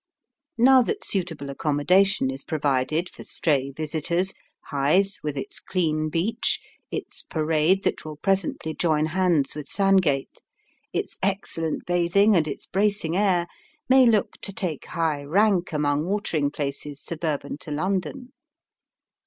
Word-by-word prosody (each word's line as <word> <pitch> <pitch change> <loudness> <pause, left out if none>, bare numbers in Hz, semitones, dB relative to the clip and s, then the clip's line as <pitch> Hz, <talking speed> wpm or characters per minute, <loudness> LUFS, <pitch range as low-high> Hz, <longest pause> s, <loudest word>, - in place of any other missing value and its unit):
Now 260 +2 +7
that 415 - -2
suitable 165 -7 -2
accommodation 150 +2 +2
is 135 +1 -6
provided 150 +2 0
for - - -12
stray 140 -4 0
visitors, 160 +5 -1 0.4
Hythe, 155 +8 +3
with 150 -2 -3
its 135 - -5
clean 155 -4 -1
beach, 200 +9 0 0.3
its - - -4
parade 160 +4 +1
that - - -1
will 155 -1 -7
presently 185 -2 -1
join 155 -2 +1
hands 170 -4 +1
with 150 -2 -6
Sandgate, 185 -9 +1 0.5
its - - -3
excellent 190 -5 -1
bathing, 180 +4 +3
and 160 -3 +3
its - - -4
bracing 200 -4 0
air, 185 -3 +2 0.4
may 260 -1 +6
look 215 -4 +2
to 200 - -3
take 180 -7 -4
high 160 -4 -1
rank 185 +4 +2
among 150 0 0
watering 175 -7 0
places 145 0 -4
suburban 155 -3 -4
to - - -10
London. 195 - -2
165 Hz, 130 wpm, -25 LUFS, 150-195 Hz, 0.5 s, Now